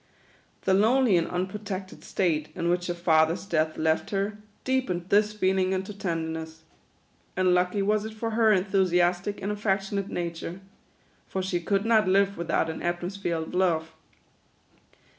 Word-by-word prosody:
The 190 Hz, -, +2 dB
lonely 225 Hz, +2 st, +4 dB
and 170 Hz, -1 st, +2 dB
unprotected 190 Hz, +1 st, -5 dB
state 155 Hz, -5 st, 0 dB
in 170 Hz, -, -1 dB
which 175 Hz, 0 st, 0 dB
her 175 Hz, -, -2 dB
father's 165 Hz, 0 st, +2 dB
death 155 Hz, -4 st, 0 dB
left 160 Hz, 0 st, +1 dB
her, 205 Hz, +1 st, -2 dB, 0.2 s
deepened 220 Hz, -10 st, -1 dB
this 210 Hz, +1 st, +4 dB
feeling 190 Hz, -2 st, +1 dB
into 190 Hz, +2 st, -3 dB
tenderness. 160 Hz, -4 st, -4 dB, 0.7 s
And 185 Hz, -1 st, +3 dB
lucky 180 Hz, +3 st, +1 dB
was 210 Hz, +1 st, +1 dB
it 220 Hz, 0 st, -6 dB
for 225 Hz, +1 st, -3 dB
her 220 Hz, 0 st, +4 dB
enthusiastic 185 Hz, -1 st, +2 dB
and 200 Hz, -, -1 dB
affectionate 200 Hz, -1 st, -1 dB
nature; 170 Hz, +1 st, -4 dB, 0.7 s
for 190 Hz, -, -3 dB
she 185 Hz, -2 st, -1 dB
could 200 Hz, +3 st, 0 dB
not 220 Hz, -3 st, +4 dB
live 195 Hz, +1 st, +3 dB
without 165 Hz, -1 st, 0 dB
an 160 Hz, -, -5 dB
atmosphere 175 Hz, +1 st, -2 dB
of 160 Hz, 0 st, -5 dB
love. 165 Hz, -3 st, +1 dB
185 Hz, 145 wpm, -27 LUFS, 170-200 Hz, 0.7 s, lonely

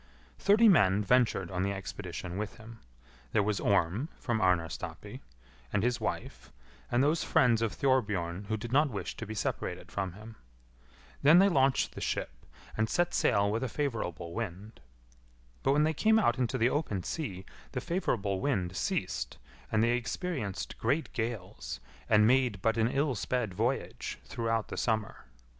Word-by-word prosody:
Thirty 210 Hz, +3 st, +5 dB
men 105 Hz, -, +5 dB
ventured 110 Hz, -6 st, +2 dB
on 90 Hz, 0 st, -1 dB
the 100 Hz, +1 st, 0 dB
expedition 95 Hz, -2 st, -5 dB
with 105 Hz, +2 st, -4 dB
him. 115 Hz, 0 st, -12 dB, 0.5 s
There 105 Hz, -, +3 dB
was 105 Hz, 0 st, 0 dB
Orm, 100 Hz, -, +1 dB
from 115 Hz, -3 st, -1 dB
Arnarstapi, 90 Hz, -3 st, -1 dB, 0.5 s
and 105 Hz, -, +1 dB
his 125 Hz, 0 st, 0 dB
wife, -, -, -4 dB, 0.4 s
and 120 Hz, +2 st, +3 dB
those 155 Hz, +3 st, +2 dB
friends 115 Hz, -3 st, +3 dB
of 115 Hz, -2 st, +1 dB
Thorbjorn 105 Hz, -9 st, 0 dB
who 110 Hz, +2 st, -1 dB
did 115 Hz, +2 st, -7 dB
not 145 Hz, +3 st, +4 dB
wish 105 Hz, -6 st, -5 dB
to -, -, -6 dB
be 110 Hz, -, -5 dB
separated -, -, -3 dB
from 95 Hz, -3 st, -3 dB
him. 110 Hz, +3 st, -12 dB, 0.8 s
Then 150 Hz, +4 st, +7 dB
they 195 Hz, +2 st, +6 dB
launched 135 Hz, -5 st, +2 dB
the -, -, -8 dB
ship, -, -, -2 dB, 0.4 s
and 110 Hz, 0 st, 0 dB
set 175 Hz, 0 st, +1 dB
sail 100 Hz, 0 st, +3 dB
with 115 Hz, +3 st, -1 dB
a 130 Hz, -, -1 dB
favourable 90 Hz, -, -3 dB
wind. 105 Hz, 0 st, -5 dB, 0.8 s
But 135 Hz, -, +3 dB
when 150 Hz, +1 st, +4 dB
they 160 Hz, +1 st, +2 dB
came 220 Hz, +8 st, +4 dB
out 130 Hz, -, +2 dB
into 130 Hz, +1 st, 0 dB
the 120 Hz, +1 st, +3 dB
open 105 Hz, -, -1 dB
sea 100 Hz, -, -4 dB, 0.3 s
the 125 Hz, -, -1 dB
favourable 120 Hz, -, -1 dB
wind 95 Hz, -11 st, 0 dB
ceased, -, -, -2 dB, 0.3 s
and 110 Hz, 0 st, +3 dB
they 120 Hz, -, +3 dB
experienced 125 Hz, -, -3 dB
great 145 Hz, +8 st, 0 dB
gales, 110 Hz, -, -4 dB, 0.3 s
and 105 Hz, -1 st, +6 dB
made 125 Hz, -4 st, +3 dB
but 110 Hz, -1 st, +3 dB
an 115 Hz, -1 st, +2 dB
ill 140 Hz, +3 st, +1 dB
sped 120 Hz, -3 st, -2 dB
voyage 115 Hz, +8 st, -2 dB
throughout 115 Hz, -1 st, -1 dB
the -, -, -5 dB
summer. 110 Hz, -2 st, -1 dB
115 Hz, 165 wpm, -30 LUFS, 100-130 Hz, 0.8 s, Then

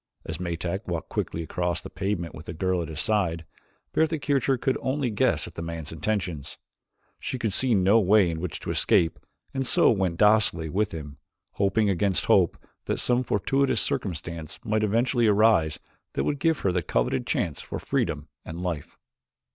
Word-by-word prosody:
As 80 Hz, 0 st, -5 dB
Metak 90 Hz, +3 st, -3 dB
walked 85 Hz, -2 st, -3 dB
quickly 85 Hz, -, -2 dB
across 85 Hz, +1 st, -2 dB
the -, -, -9 dB
pavement 95 Hz, -4 st, -2 dB
with 80 Hz, -, -10 dB
the -, -, -4 dB
girl 90 Hz, +1 st, 0 dB
at 85 Hz, -, -4 dB
his 80 Hz, -2 st, -5 dB
side, 90 Hz, -6 st, +1 dB, 0.5 s
Bertha 160 Hz, 0 st, +2 dB
Kircher 135 Hz, -3 st, +1 dB
could 130 Hz, +2 st, 0 dB
only 130 Hz, -2 st, -1 dB
guess 105 Hz, -, +1 dB
at -, -, -10 dB
the -, -, -6 dB
man's 85 Hz, -2 st, -5 dB
intentions. 90 Hz, -3 st, -3 dB, 0.6 s
She 130 Hz, -, -3 dB
could 110 Hz, -5 st, -1 dB
see 125 Hz, 0 st, +3 dB
no 100 Hz, +4 st, +5 dB
way 105 Hz, -1 st, +5 dB
in 80 Hz, -, -4 dB
which 85 Hz, -1 st, -4 dB
to -, -, -3 dB
escape 80 Hz, -1 st, +2 dB, 0.3 s
and 135 Hz, -, -1 dB
so -, -, +5 dB
she 100 Hz, -, -3 dB
went 90 Hz, -3 st, 0 dB
docilely 105 Hz, -6 st, +4 dB
with 105 Hz, +5 st, 0 dB
him, 75 Hz, -4 st, -8 dB, 0.3 s
hoping 100 Hz, +2 st, +1 dB
against 95 Hz, 0 st, +1 dB
hope -, -, +4 dB, 0.3 s
that -, -, -1 dB
some 125 Hz, 0 st, +2 dB
fortuitous 135 Hz, +4 st, +1 dB
circumstance 85 Hz, -4 st, -3 dB
might 110 Hz, 0 st, +1 dB
eventually 115 Hz, +3 st, +2 dB
arise 105 Hz, -7 st, +4 dB, 0.3 s
that -, -, 0 dB
would 145 Hz, -1 st, -1 dB
give 160 Hz, +2 st, +1 dB
her 95 Hz, -, +2 dB
the 90 Hz, 0 st, 0 dB
coveted -, -, 0 dB
chance 80 Hz, -, -1 dB
for -, -, -6 dB
freedom 75 Hz, +1 st, -1 dB, 0.2 s
and 80 Hz, +1 st, -7 dB
life. 85 Hz, -5 st, -4 dB
95 Hz, 180 wpm, -26 LUFS, 85-110 Hz, 0.6 s, no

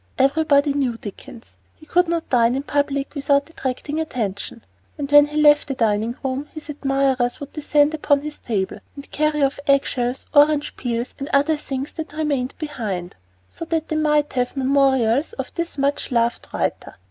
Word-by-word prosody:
Everybody 285 Hz, +1 st, +3 dB
knew 260 Hz, -5 st, -1 dB
Dickens. 230 Hz, +3 st, -11 dB, 0.2 s
He 310 Hz, -, -18 dB
could 355 Hz, +3 st, +2 dB
not 335 Hz, -1 st, -2 dB
dine 240 Hz, -1 st, +3 dB
in 270 Hz, -, -2 dB
public 285 Hz, -1 st, -1 dB
without 280 Hz, -1 st, +1 dB
attracting 290 Hz, +2 st, -3 dB
attention. 225 Hz, -7 st, -4 dB, 0.3 s
When 290 Hz, 0 st, +5 dB
he 300 Hz, +1 st, -2 dB
left 295 Hz, -1 st, +5 dB
the 270 Hz, -, -3 dB
dining 225 Hz, 0 st, 0 dB
room, 270 Hz, +2 st, -2 dB
his 310 Hz, 0 st, -9 dB
admirers 270 Hz, -3 st, 0 dB
would 285 Hz, -, -8 dB
descend 295 Hz, 0 st, +2 dB
upon 290 Hz, -2 st, +2 dB
his 300 Hz, 0 st, -7 dB
table 200 Hz, -5 st, -2 dB, 0.2 s
and 280 Hz, 0 st, -11 dB
carry 305 Hz, -1 st, +1 dB
off 275 Hz, +1 st, 0 dB
egg 275 Hz, 0 st, +4 dB
shells, 245 Hz, +1 st, -2 dB
orange 295 Hz, 0 st, +4 dB
peels, 240 Hz, 0 st, -3 dB
and 275 Hz, -, -5 dB
other 290 Hz, +3 st, +3 dB
things 275 Hz, -2 st, -5 dB
that 320 Hz, -2 st, -7 dB
remained 285 Hz, -4 st, -1 dB
behind, 215 Hz, -, -4 dB, 0.3 s
so -, -, -8 dB
that 325 Hz, -1 st, -2 dB
they 310 Hz, -, -1 dB
might 300 Hz, -1 st, +1 dB
have 250 Hz, +2 st, -1 dB
memorials 270 Hz, -, +2 dB
of -, -, -6 dB
this 335 Hz, -3 st, -4 dB
much 280 Hz, 0 st, 0 dB
loved 235 Hz, -1 st, 0 dB
writer. -, -, -3 dB
280 Hz, 170 wpm, -21 LUFS, 250-300 Hz, 0.3 s, When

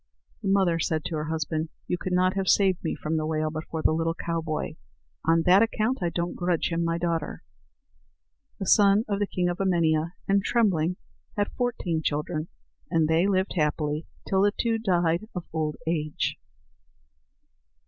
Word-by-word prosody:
The 205 Hz, -, -4 dB
mother 190 Hz, -4 st, +3 dB
said 155 Hz, -1 st, -1 dB
to 165 Hz, -, -3 dB
her 150 Hz, -, -2 dB
husband: 160 Hz, 0 st, -2 dB, 0.2 s
"You -, -, 0 dB
could 185 Hz, +1 st, -5 dB
not 185 Hz, +1 st, +3 dB
have 195 Hz, -1 st, -1 dB
saved 190 Hz, -3 st, +3 dB
me 165 Hz, -, -1 dB
from 160 Hz, +1 st, -2 dB
the 155 Hz, -, -1 dB
whale 155 Hz, 0 st, 0 dB
but 155 Hz, 0 st, -5 dB
for 160 Hz, -1 st, -3 dB
the -, -, +4 dB
little 165 Hz, +1 st, 0 dB
cowboy; 165 Hz, -2 st, -3 dB, 0.5 s
on 165 Hz, 0 st, +4 dB
that 185 Hz, +3 st, +6 dB
account 230 Hz, +2 st, +1 dB
I 175 Hz, -, +1 dB
don't 170 Hz, +1 st, -2 dB
grudge 175 Hz, -2 st, 0 dB
him 165 Hz, 0 st, 0 dB
my 165 Hz, 0 st, 0 dB
daughter." 165 Hz, -3 st, -2 dB, 1.1 s
The 195 Hz, -, -4 dB
son 205 Hz, +3 st, +5 dB
of 200 Hz, -1 st, -1 dB
the 205 Hz, -, +1 dB
king 180 Hz, -2 st, -1 dB
of 175 Hz, 0 st, -2 dB
Emania 170 Hz, -3 st, +2 dB
and 195 Hz, 0 st, +3 dB
Trembling 180 Hz, -8 st, +2 dB, 0.4 s
had 205 Hz, 0 st, 0 dB
fourteen 210 Hz, -10 st, -1 dB
children, 155 Hz, +1 st, -2 dB, 0.4 s
and 160 Hz, -2 st, +2 dB
they 165 Hz, +4 st, +3 dB
lived 190 Hz, -1 st, +1 dB
happily 150 Hz, -1 st, -1 dB, 0.2 s
till 190 Hz, 0 st, +2 dB
the 205 Hz, +1 st, +3 dB
two 230 Hz, -1 st, +1 dB
died 175 Hz, -2 st, +1 dB
of 180 Hz, -, -4 dB
old 155 Hz, -2 st, -1 dB
age. 155 Hz, -2 st, -1 dB
170 Hz, 175 wpm, -26 LUFS, 160-195 Hz, 1.1 s, that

